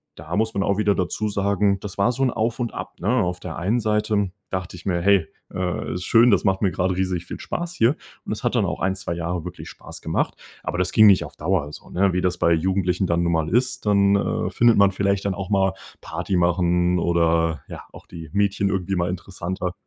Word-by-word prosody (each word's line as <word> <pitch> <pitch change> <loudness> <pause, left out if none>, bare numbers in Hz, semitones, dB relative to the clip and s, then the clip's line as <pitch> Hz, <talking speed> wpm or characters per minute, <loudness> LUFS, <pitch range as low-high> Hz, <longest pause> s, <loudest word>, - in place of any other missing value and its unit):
da 80 +3 -6
muss 110 +1 0
man 100 - 0
auch 100 0 +1
wieder 105 -1 +3
dazu 95 +4 -1
sagen. 100 -1 +1
Das 105 -2 -7
war 100 +4 +3
so 130 +2 -1
'n 130 - +3
Auf 115 +3 -1
und 120 -2 -2
Ab, - - -6
ne? 95 - -1
Auf 90 0 -2
der 90 -2 -7
einen 100 +8 0
Seite 105 -3 0 0.2
dachte 90 -1 -4
ich 90 - -14
mir: 85 -3 0
„Hey, 95 -3 +3 0.3
äh, 90 -1 -2
ist 90 - -4
schön, 115 +1 +5
das 100 - +3
macht 95 -2 +1
mir 100 -3 +2
gerade 90 +1 0
riesig 90 -2 -1
viel - - -7
Spaß 175 0 -4
hier.“ 115 +2 +3 0.3
Und - - -8
das - - -4
hat - - 0
dann - - +2
auch - - -3
ein, 95 +1 0
2 95 -2 -4
Jahre 85 0 -3
wirklich - - -8
Spaß - - -11
gemacht. - - -1 0.3
Aber - - -3
das 90 0 0
ging 110 -1 +7
nicht 100 -3 +5
auf - - -12
Dauer 80 -3 -1
so, - - -12
ne, 95 +1 +1
wie 90 - 0
das 90 -1 0
bei 85 - +3
Jugendlichen 90 +2 0
dann 85 0 +1
nun 85 - +1
mal 80 -1 0
ist 125 +2 0
dann, 100 -1 +4
äh, 100 - 0
findet 120 -1 +4
man 100 -1 +5
vielleicht 100 +1 0
dann 100 -2 0
auch 100 0 -5
mal 95 -2 +2 0.3
Party 90 +4 -3
machen, 90 0 +2
oder 85 -3 +1
ja, - - -8
auch - - -13
die 80 -3 -10
Mädchen 100 -1 +1
irgendwie 95 0 -1
mal 85 -1 0
interessanter. 90 0 -4
95 Hz, 240 wpm, -23 LUFS, 90-100 Hz, 0.3 s, ging